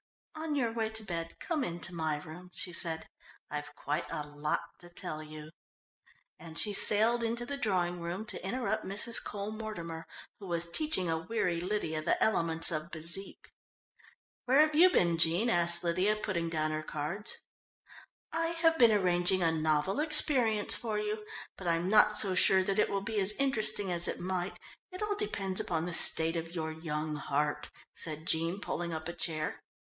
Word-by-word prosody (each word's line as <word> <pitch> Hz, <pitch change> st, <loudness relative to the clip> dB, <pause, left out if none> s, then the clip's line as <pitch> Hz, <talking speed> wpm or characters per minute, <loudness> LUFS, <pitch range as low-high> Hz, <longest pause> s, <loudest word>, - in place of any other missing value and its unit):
"On 315 Hz, -1 st, -4 dB
your 240 Hz, -5 st, 0 dB
way 225 Hz, -1 st, -2 dB
to 220 Hz, 0 st, -3 dB
bed, 165 Hz, -4 st, -5 dB
come 315 Hz, -5 st, -2 dB
in 175 Hz, -4 st, -5 dB
to 175 Hz, -, -2 dB
my 160 Hz, -3 st, -2 dB
room," 160 Hz, +4 st, -11 dB
she 180 Hz, -, -5 dB
said. 160 Hz, -1 st, -3 dB, 0.4 s
"I've 150 Hz, 0 st, -6 dB
quite 150 Hz, +4 st, -3 dB
a 150 Hz, -, -5 dB
lot 145 Hz, +1 st, -3 dB, 0.2 s
to 175 Hz, -, -13 dB
tell 155 Hz, -3 st, -7 dB
you," 155 Hz, 0 st, -11 dB, 0.9 s
and 160 Hz, -1 st, -9 dB
she 210 Hz, -, +1 dB
sailed 220 Hz, +4 st, +5 dB
into 235 Hz, +1 st, -3 dB
the 280 Hz, -, -5 dB
drawing 180 Hz, -9 st, -1 dB
room 175 Hz, +5 st, -5 dB
to -, -, -8 dB
interrupt 215 Hz, +1 st, -2 dB
Mrs. 205 Hz, +4 st, +2 dB
Cole 205 Hz, 0 st, -5 dB
Mortimer, 170 Hz, -7 st, -7 dB, 0.3 s
who 200 Hz, -, -10 dB
was 170 Hz, -1 st, -2 dB
teaching 300 Hz, -, +2 dB
a 160 Hz, -1 st, -1 dB
weary 175 Hz, -2 st, -2 dB
Lydia 180 Hz, -5 st, -3 dB
the 160 Hz, -, 0 dB
elements 165 Hz, -6 st, +3 dB
of 155 Hz, +1 st, -4 dB
bezique. 170 Hz, +4 st, -5 dB, 0.9 s
"Where 265 Hz, +4 st, +4 dB
have 310 Hz, 0 st, +2 dB
you 345 Hz, +5 st, +6 dB
been, 170 Hz, -, +1 dB
Jean?" 175 Hz, +9 st, +3 dB
asked 175 Hz, -2 st, +1 dB
Lydia, 185 Hz, +5 st, +1 dB
putting 175 Hz, -6 st, -3 dB
down 155 Hz, -1 st, -2 dB
her 155 Hz, 0 st, -3 dB
cards. 155 Hz, +7 st, -5 dB, 0.9 s
"I 330 Hz, 0 st, -1 dB, 0.2 s
have 325 Hz, -1 st, +3 dB
been 235 Hz, -2 st, +6 dB
arranging 180 Hz, -2 st, +2 dB
a 165 Hz, -, +2 dB
novel 155 Hz, -, 0 dB
experience 275 Hz, -8 st, +3 dB
for 220 Hz, -3 st, -3 dB
you, 210 Hz, 0 st, -4 dB, 0.3 s
but 185 Hz, -, -8 dB
I'm 170 Hz, +2 st, 0 dB
not 210 Hz, 0 st, +4 dB
so 195 Hz, -3 st, +4 dB
sure 190 Hz, +1 st, +4 dB
that 195 Hz, +2 st, -1 dB
it -, -, +2 dB
will 200 Hz, 0 st, -2 dB
be 220 Hz, 0 st, -2 dB
as 195 Hz, +2 st, +4 dB
interesting 215 Hz, -7 st, +1 dB
as 175 Hz, -1 st, +3 dB
it -, -, -4 dB
might 185 Hz, 0 st, -4 dB, 0.3 s
it 370 Hz, +3 st, -6 dB
all 420 Hz, -1 st, -1 dB
depends 195 Hz, -, -2 dB
upon 165 Hz, -2 st, -2 dB
the 175 Hz, -, -3 dB
state 165 Hz, 0 st, +9 dB
of 165 Hz, +1 st, -5 dB
your 160 Hz, -1 st, -3 dB
young 155 Hz, -1 st, -4 dB
heart," 150 Hz, +1 st, -2 dB, 0.2 s
said 155 Hz, -1 st, -4 dB
Jean, 165 Hz, +4 st, 0 dB
pulling 175 Hz, -3 st, -4 dB
up 160 Hz, 0 st, -5 dB
a 170 Hz, -, -5 dB
chair. 155 Hz, -3 st, -4 dB
180 Hz, 185 wpm, -30 LUFS, 165-215 Hz, 0.9 s, state